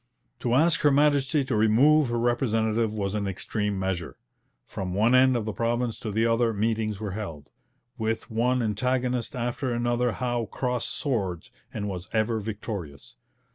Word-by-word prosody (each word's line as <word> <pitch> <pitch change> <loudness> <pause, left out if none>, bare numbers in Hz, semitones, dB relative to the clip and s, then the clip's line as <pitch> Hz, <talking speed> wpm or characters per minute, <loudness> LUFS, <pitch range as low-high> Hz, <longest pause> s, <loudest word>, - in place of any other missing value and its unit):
To 120 0 0
ask 165 +4 +4
Her 145 - +4
Majesty 145 0 +3
to 130 - -1
remove 125 +7 +4
her 120 - -1
representative 115 -2 +1
was 100 -2 -2
an 105 -2 -1
extreme 105 +1 -2
measure. 95 -3 -3 0.5
From 90 -1 -5
one 110 +5 +3
end 130 0 +5
of 110 - -3
the 110 - -3
province 120 +1 -1
to 110 - -5
the 110 +2 +1
other 115 0 +2
meetings 110 -1 -1
were 105 -2 -4
held. 85 -8 -7 0.5
With 110 +1 -2
one 125 +2 +1
antagonist 125 +4 -1
after 120 +1 -2
another 120 0 0
Howe 120 -3 -2
crossed 125 -2 -2
swords, 100 - -2 0.2
and 105 -1 -4
was 95 -2 -6
ever 110 +1 +1
victorious. 100 - -6
115 Hz, 160 wpm, -26 LUFS, 105-125 Hz, 0.5 s, end